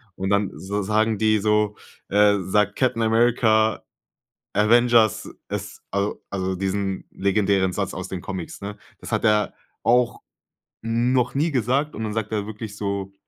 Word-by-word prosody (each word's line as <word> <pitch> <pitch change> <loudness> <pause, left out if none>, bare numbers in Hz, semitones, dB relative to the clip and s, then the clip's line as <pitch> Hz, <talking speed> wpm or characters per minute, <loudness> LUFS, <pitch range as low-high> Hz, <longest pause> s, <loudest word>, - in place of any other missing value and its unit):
Und 95 0 -3
dann 100 -1 +1
so 100 +2 -3
sagen 110 +1 +1
die 110 0 +3
so 105 0 +1 0.3
äh, 105 0 +4
sagt 105 +2 +1
Captain 125 -3 +1
America: 110 -1 +3 0.7
„Avengers, 115 +1 +4 0.2
es", - - -5
al 100 +1 0 0.2
also 95 -1 -2
diesen 95 0 -2
legendären 95 -1 +1
Satz 100 -2 -2
aus 95 +1 -5
den 90 -2 -5
Comics, 95 -2 -6
ne? 100 +1 -6 0.2
Das - - -9
hat - - 0
er 105 -2 +2 0.3
auch 120 0 +2 0.6
noch 120 +3 +1
nie 155 +3 +1
gesagt 135 +4 0
und 110 - -4
dann 105 -1 -3
sagt 110 -1 -3
er 105 -1 -2
wirklich 105 -1 -7
so: 100 -1 -3
105 Hz, 155 wpm, -23 LUFS, 100-115 Hz, 0.7 s, äh